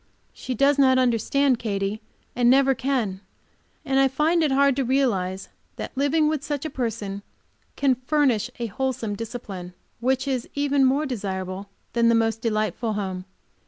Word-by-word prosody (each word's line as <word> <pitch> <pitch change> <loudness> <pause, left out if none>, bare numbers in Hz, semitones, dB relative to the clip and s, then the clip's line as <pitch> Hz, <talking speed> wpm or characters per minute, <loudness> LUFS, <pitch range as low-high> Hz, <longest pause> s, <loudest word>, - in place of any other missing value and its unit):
She 255 - -5
does 280 +4 +3
not 260 -1 +5
understand 255 +2 +2
Katy, 200 0 -2 0.3
and 240 -1 +3
never 270 +1 +5
can, 245 -8 -1 0.6
and 270 0 +2
I 270 - +5
find 305 +6 +1
it 305 -3 +2
hard 275 0 +4
to 275 - +1
realize 200 -8 0 0.3
that - - -6
living 285 +3 +2
with 305 -2 -1
such 290 0 -3
a 310 - -3
person 220 -6 -3 0.5
can 275 -2 +3
furnish 255 -3 +1
a 235 - -1
wholesome 230 -2 -2
discipline, 200 -5 -7 0.2
which 260 +3 0
is 255 -3 -2
even 285 -1 +2
more 275 +4 +2
desirable 195 -5 -4 0.2
than 235 -1 +3
the 230 - +4
most 225 0 +1
delightful 215 0 -1
home. 190 -3 -4
250 Hz, 160 wpm, -24 LUFS, 215-275 Hz, 0.6 s, not